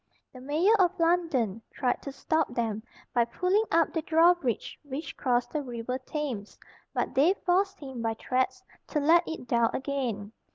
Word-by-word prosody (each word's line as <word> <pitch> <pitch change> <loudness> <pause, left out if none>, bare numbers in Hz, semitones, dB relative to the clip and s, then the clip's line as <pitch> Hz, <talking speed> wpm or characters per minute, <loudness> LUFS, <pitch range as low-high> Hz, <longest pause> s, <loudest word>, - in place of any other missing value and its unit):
The 255 - -11
Mayor 310 +10 +3
of 365 -1 +3
London 325 - +1
tried 250 -3 -1
to 280 - -6
stop 300 -2 -1
them, 220 -3 -1 0.3
by 240 - +4
pulling 365 - +1
up 330 -1 +2
the 325 - 0
drawbridge 325 - +2
which 285 +1 -6
crossed 245 -2 0
the 305 - -1
river 250 -1 -4
Thames, 255 -7 -5 0.3
but - - -2
they 320 +8 +4
forced 385 +2 +2
him 265 -4 -7
by 225 -1 -1
threats 255 +3 -1 0.2
to 300 - -1
let 325 +4 +5
it 320 -6 -6
down 235 -1 +3
again. 250 -7 -3
275 Hz, 165 wpm, -28 LUFS, 240-330 Hz, 0.3 s, let